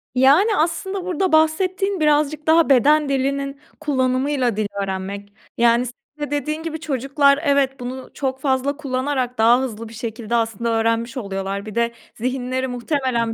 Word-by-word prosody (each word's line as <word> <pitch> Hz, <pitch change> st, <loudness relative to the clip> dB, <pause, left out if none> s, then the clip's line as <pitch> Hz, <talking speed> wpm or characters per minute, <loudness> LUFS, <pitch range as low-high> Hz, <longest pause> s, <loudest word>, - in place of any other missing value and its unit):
Yani, 305 Hz, -, +5 dB
aslında 355 Hz, +4 st, -1 dB
burada 370 Hz, 0 st, 0 dB
bahsettiğin 370 Hz, +5 st, +2 dB
birazcık 300 Hz, 0 st, +1 dB
daha 325 Hz, -1 st, +5 dB
beden 290 Hz, +3 st, +4 dB
dilinin 275 Hz, +1 st, -1 dB, 0.2 s
kullanımıyla 260 Hz, -4 st, 0 dB
dil 215 Hz, -1 st, 0 dB, 0.2 s
öğrenmek. 195 Hz, +1 st, -5 dB, 0.2 s
Yani, 235 Hz, +1 st, +4 dB
senin 295 Hz, +4 st, -8 dB
de 290 Hz, -, -12 dB
dediğin 305 Hz, +3 st, -2 dB
gibi, 320 Hz, -1 st, -4 dB
çocuklar 280 Hz, -1 st, +2 dB
evet 280 Hz, -2 st, +2 dB
bunu 255 Hz, +1 st, -6 dB
çok 265 Hz, -1 st, -3 dB
fazla 275 Hz, +1 st, 0 dB
kullanarak 260 Hz, -2 st, -2 dB
daha 235 Hz, +3 st, +5 dB
hızlı 230 Hz, -3 st, -5 dB
bir -, -, -12 dB
şekilde 230 Hz, 0 st, -4 dB
aslında 230 Hz, 0 st, -1 dB
öğrenmiş 230 Hz, +2 st, 0 dB
oluyorlar. 195 Hz, -1 st, -4 dB
Bir 215 Hz, -, -8 dB
de 235 Hz, 0 st, +1 dB, 0.2 s
zihinleri 255 Hz, +2 st, -2 dB
muhtemelen 245 Hz, -2 st, -1 dB
265 Hz, 150 wpm, -21 LUFS, 235-295 Hz, 0.2 s, Yani